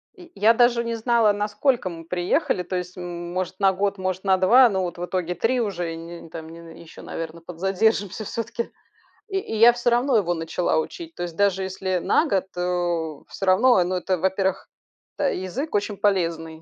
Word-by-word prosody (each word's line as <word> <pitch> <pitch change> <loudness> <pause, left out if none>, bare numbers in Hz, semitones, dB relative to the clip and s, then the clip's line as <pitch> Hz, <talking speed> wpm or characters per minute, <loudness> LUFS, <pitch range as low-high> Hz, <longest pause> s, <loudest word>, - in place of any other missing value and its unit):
И 355 -3 -15
я 220 +3 +5
даже 240 0 +3
не 230 0 -2
знала, 230 -1 +3
на 205 +1 -1
сколько 240 -1 0
мы 165 -1 -9
приехали, 180 +1 0
то 185 - -5
есть, 180 0 -5
м 175 -1 -6
может, 185 0 -3
на 195 -1 +4
год, 200 +1 -1
может, 185 0 -3
на 190 -1 +3
два. 240 +7 +6
Но 190 -3 -1
вот 175 -1 -4
в 175 - -3
итоге 180 -1 -2
3 240 +7 +1
уже, 175 -6 -2
и - - -7
не 170 0 -10
там 160 0 -8
не 165 0 -12
еще, 165 - -13
наверно, 165 0 -6
подзадержимся 195 +4 0
всё-таки. 230 +2 -4 0.6
И 390 -3 -2
и 300 - -5
я 230 +2 +8
всё 240 0 0
равно 245 +1 +3
его 175 -4 +1
начала 165 +1 -1
учить, 330 - -6
то - - -4
есть, 170 -2 -6
даже 195 0 +2
если 190 0 -2
на 305 - +2
год, 195 -9 +1
э, 175 -3 -1
всё 195 - -5
равно. 205 +5 +5
Э, - - +4
ну, 180 +1 -2
это, 185 +1 -1
во-первых, 190 +1 0 0.5
это 285 - +1
язык 220 - -4
очень 205 0 -1
полезный. 165 -5 0
190 Hz, 205 wpm, -24 LUFS, 175-225 Hz, 0.6 s, я